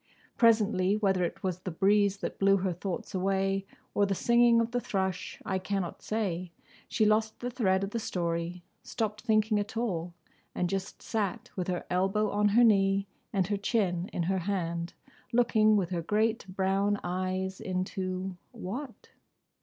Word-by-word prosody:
Presently—whether 205 -4 +3
it 170 - -3
was 185 -2 -1
the 185 - -5
breeze 200 +3 +3
that - - -4
blew 195 0 +5
her 185 -1 -1
thoughts 180 +3 -5
away, 195 +1 0 0.3
or 205 - +3
the 195 - 0
singing 235 +2 +4
of 230 0 0
the 245 - 0
thrush, 190 -3 -2
I 190 -1 0
cannot 190 -2 -3
say—she 185 0 -3
lost 215 +1 +2
the 245 0 -3
thread 195 -6 +1
of 195 - -3
the 230 - -2
story; 170 -2 -2 0.2
stopped 215 -1 -3
thinking 215 -2 +2
at 205 +2 -4
all; 175 -7 -2 0.4
and 180 - 0
just 195 0 -4
sat 205 -5 -2
with 180 -2 -2
her 180 -1 -2
elbow 195 +3 +1
on 210 0 +3
her 225 +4 +5
knee 195 -3 +4 0.3
and 195 -4 +1
her 205 +2 -1
chin 195 -4 0
in 175 - -1
her 190 +2 0
hand, 170 -2 -2 0.4
looking 220 -3 +4
with 185 -3 -1
her 175 -2 -1
great 215 +4 0
brown 195 +2 +1
eyes 185 +1 -2
into—what? 185 +6 -5
195 Hz, 155 wpm, -29 LUFS, 185-215 Hz, 0.4 s, blew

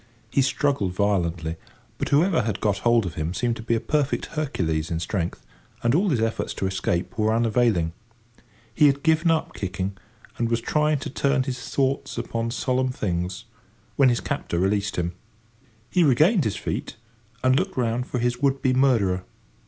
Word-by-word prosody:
He 140 - +3
struggled 135 -8 +1
violently, 85 -5 0 0.4
but - - -2
whoever 165 +3 +3
had 110 -2 -2
got 100 -2 0
hold 120 0 +3
of 85 - -4
him 80 +4 -3
seemed 120 -1 0
to - - -7
be 115 +1 0
a - - +1
perfect 145 +4 0
Hercules 85 - -1
in 80 - -1
strength, 85 0 -3 0.4
and 120 0 +3
all 190 +6 +3
his 135 -8 +1
efforts 115 0 -1
to - - -2
escape 95 +2 -1
were 110 0 +3
unavailing. 115 -7 +2 0.8
He 150 +5 +5
had 140 0 +1
given 160 +1 +3
up 160 -1 +1
kicking, 95 0 -3 0.4
and 115 -1 +1
was 115 0 +1
trying 150 +5 +1
to - - -5
turn 140 -1 +1
his 125 -2 -5
thoughts 135 0 -1
upon 115 0 -2
solemn 130 +1 0
things, 90 -6 -3 0.5
when 135 -2 +5
his 120 - +1
captor 85 - -3
released 100 +3 +1
him. 85 -1 -1 0.8
He 180 - +4
regained 155 - +4
his 105 - 0
feet, - - -4 0.5
and 130 0 +4
looked 190 +4 -1
round 120 0 0
for - - -3
his 120 0 0
would 140 -1 +2
be 130 - +3
murderer. 115 -9 +2
115 Hz, 175 wpm, -24 LUFS, 95-140 Hz, 0.8 s, He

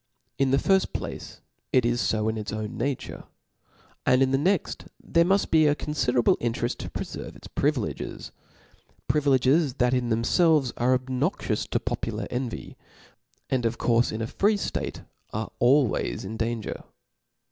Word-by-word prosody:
In 135 -1 +3
the 135 - +3
firft 190 +5 +2
place - - -6 0.3
it 130 -2 +3
is 120 0 +1
fo 110 0 0
in 110 - 0
its 105 -2 -4
own 110 0 -4
nature; 140 0 -3 0.8
and 130 +1 +4
in 130 - +1
the 135 - +3
next 185 +4 0
there 170 - +2
muft 195 +3 +1
be 155 -1 +5
a 145 - +3
conGderable 125 -6 +1
intereft 120 +1 -1
to - - -6
■preferve - - -6
its - - -14
privileges - - -2 0.7
•, - - -56
privileges 140 0 +3
that 125 -2 +2
in 125 -2 0
them 115 0 +1
felves 155 -4 +3
are 125 +2 +3
obnoxious 130 0 -1
to - - 0
popular - - -3
eiyvy, 125 -2 -4 0.7
and 130 -2 0
of 115 0 0
courfe 120 0 +2
in 110 +1 -3
a - - -1
free 205 - +2
ftate - - -4 0.3
are 110 +1 -3
always 130 -5 +2
in 110 +4 -5
danger. 115 -1 -3
125 Hz, 160 wpm, -26 LUFS, 115-145 Hz, 0.8 s, be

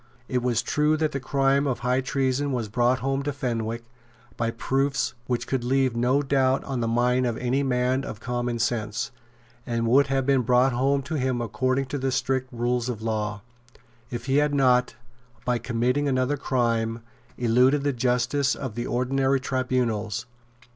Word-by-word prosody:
It 125 -1 0
was 120 -1 +1
true 150 +4 +2
that 155 -1 0
the 140 - -3
crime 135 +1 +1
of 130 - -2
high 125 +2 +1
treason 135 +1 0
was 120 -5 -2
brought 120 +2 +2
home 135 +1 0
to 145 +1 -2
Fenwick 115 -4 -3 0.5
by 115 -1 -1
proofs 135 +4 0
which 125 -2 -1
could 130 -3 -2
leave 130 -1 +1
no 125 +4 +2
doubt 135 -1 +2
on 135 -3 -3
the 115 - 0
mind 125 +2 +2
of 115 -2 -2
any 125 +3 0
man 130 0 +1
of 110 - -7
common 120 0 -2
sense, 115 +2 -1 0.5
and 115 -1 -1
would 135 +4 +5
have 135 -1 0
been 135 -1 +3
brought 125 +1 +3
home 135 +3 +1
to 155 +2 -3
him 130 -1 0
according 130 +4 0
to 140 +2 -4
the 135 0 -1
strict 130 0 -1
rules 120 0 -1
of 110 -3 -4
law, 105 -2 -2 0.7
if 120 0 -5
he 135 +1 +2
had 145 0 +2
not, 125 -3 +3 0.5
by 125 -1 +1
committing 125 +5 0
another 130 +1 +1
crime, 115 -4 0 0.4
eluded 125 +4 +3
the 145 -1 +1
justice 125 +3 +1
of 130 -5 -5
the 120 +2 -4
ordinary 135 +2 +1
tribunals. 125 -5 -1
125 Hz, 175 wpm, -25 LUFS, 120-135 Hz, 0.7 s, would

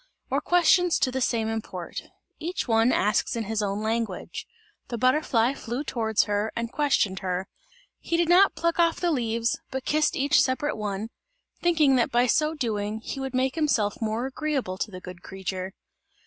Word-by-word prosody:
or - - +1
questions 355 0 +4
to 265 -2 +1
the 260 +1 -2
same 230 -3 +1
import. 215 -6 -5 0.4
Each 345 0 -3
one 225 +1 +4
asks 210 +1 +1
in 230 - -1
his 220 +1 -2
own 205 +1 -2
language. 220 -3 -3 0.4
The 235 - -4
butterfly 255 -1 +2
flew 245 +1 -4
towards 220 -6 +1
her 210 +1 -1
and 235 0 -3
questioned 250 -10 +1
her; 185 0 -2 0.5
he 335 - -1
did 340 -1 +2
not 365 +3 +5
pluck 335 +1 0
off 335 -1 +3
the 350 -1 +1
leaves, 230 -4 0
but 265 0 -5
kissed 305 0 +2
each 280 +2 +4
separate 275 +3 0
one, 210 0 -3 0.5
thinking 310 -6 +4
that 240 - +2
by 240 +1 +3
so 305 +6 +2
doing, 215 -5 -2
he 270 - -5
would 265 -1 -4
make 260 +1 +1
himself 260 -11 0
more 220 +2 -1
agreeable 265 -9 -2
to - - -2
the 185 -2 -9
good 180 -1 -10
creature. 190 0 -5
235 Hz, 175 wpm, -26 LUFS, 210-295 Hz, 0.5 s, not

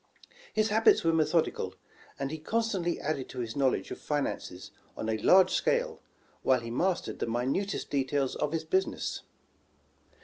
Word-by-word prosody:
His 215 0 +1
habits 220 +2 +4
were 165 0 +3
methodical, 160 0 +1 0.4
and 135 0 -3
he 160 - -5
con 225 +9 0
stantly 190 -7 -1
added 140 -3 -3
to 130 - -7
his 115 -2 -4
knowledge 135 -2 +1
of - - -6
finances 135 -10 -3 0.3
on 110 - -3
a 110 0 0
large 190 - +6
scale, - - 0 0.4
while 130 -2 +3
he 115 0 -6
mastered 175 +9 -1
the - - -1
minutest 130 - -1
details 135 -1 0
of 150 - -1
his 160 -1 -1
business. 190 +4 -1
155 Hz, 160 wpm, -29 LUFS, 130-190 Hz, 0.4 s, large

